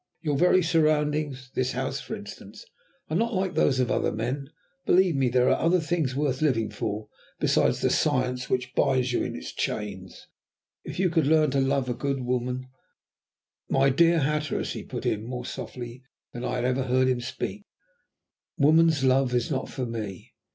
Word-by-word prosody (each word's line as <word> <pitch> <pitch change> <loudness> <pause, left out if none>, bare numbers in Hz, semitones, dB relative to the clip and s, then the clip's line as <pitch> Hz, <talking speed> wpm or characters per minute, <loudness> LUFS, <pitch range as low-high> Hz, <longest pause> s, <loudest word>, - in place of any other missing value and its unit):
Your 150 -3 0
very 180 +4 +4
surroundings 150 -5 +1
this 130 0 0
house, 130 +2 -2
for 220 - -5
instance 205 - -11 0.5
are - - 0
not 230 +4 +1
like 185 -1 0
those 130 -2 +2
of 125 - +1
other - - +1
men. 125 +6 -3 0.3
Believe 180 -2 +4
me, 135 -2 +2
there 125 +1 +3
are - - +3
other 175 +2 +4
things 160 -5 -1
worth 140 -2 -1
living 115 -8 +1
for 105 +1 -4 0.3
besides - - +2
the - - +2
Science 125 -3 0
which 125 0 -1
binds 125 -1 +2
you - - +1
in - - -4
its 60 0 -7
chains. 95 -4 -4 0.6
If - - -7
you 180 -1 +2
could 160 -4 +2
learn 155 -2 +4
to 140 - +1
love 135 -1 +1
a 125 - 0
good 135 +2 -2
woman 125 +1 -2 0.5
" - - -56
"My 135 0 +5
dear 165 +4 +4
Hatteras," 150 +2 -1
he - - -5
put - - -7
in, 105 0 0
more 125 +1 -5
softly 120 0 -7 0.3
than 120 - -6
I - - -2
had 125 -1 -1
ever 130 +1 0
heard 130 0 +2
him 125 -1 +1
speak, 205 +10 -5 0.9
"woman's 160 -1 +4
love 130 -1 +3
is 120 +2 0
not 130 -2 -2
for 130 - -4
me. 110 -5 -6
130 Hz, 185 wpm, -26 LUFS, 125-155 Hz, 0.9 s, My